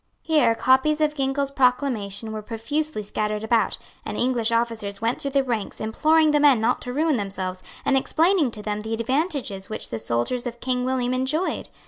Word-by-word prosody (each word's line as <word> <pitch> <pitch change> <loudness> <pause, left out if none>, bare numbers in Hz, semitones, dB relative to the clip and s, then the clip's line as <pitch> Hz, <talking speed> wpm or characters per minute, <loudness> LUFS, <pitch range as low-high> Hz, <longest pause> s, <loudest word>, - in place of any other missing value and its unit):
Here 300 -8 +3
copies 265 +6 +3
of 305 -1 +2
Ginkell's 275 0 -1
proclamation 250 -6 0
were 215 0 -4
profusely 245 +4 -2
scattered 210 +1 -2
about; 225 0 +1 0.3
and - - -5
English 240 -2 +1
officers 230 -4 -1
went 230 +2 -1
through 280 - -2
the 275 0 +2
ranks 230 -6 -3
imploring 310 +8 +3
the 295 - +3
men 285 -5 +5
not 225 - +1
to 250 - -5
ruin 305 +1 +1
themselves, 190 -3 -4 0.2
and 275 - +3
explaining 320 +3 +3
to 215 -2 -6
them 210 0 -2
the 220 +1 -3
advantages 255 - -2
which 215 - -6
the 115 - -4
soldiers 120 - -1
of 240 0 -7
King 250 0 -1
William 255 -1 0
enjoyed. 270 +8 -1
250 Hz, 180 wpm, -24 LUFS, 220-280 Hz, 0.3 s, men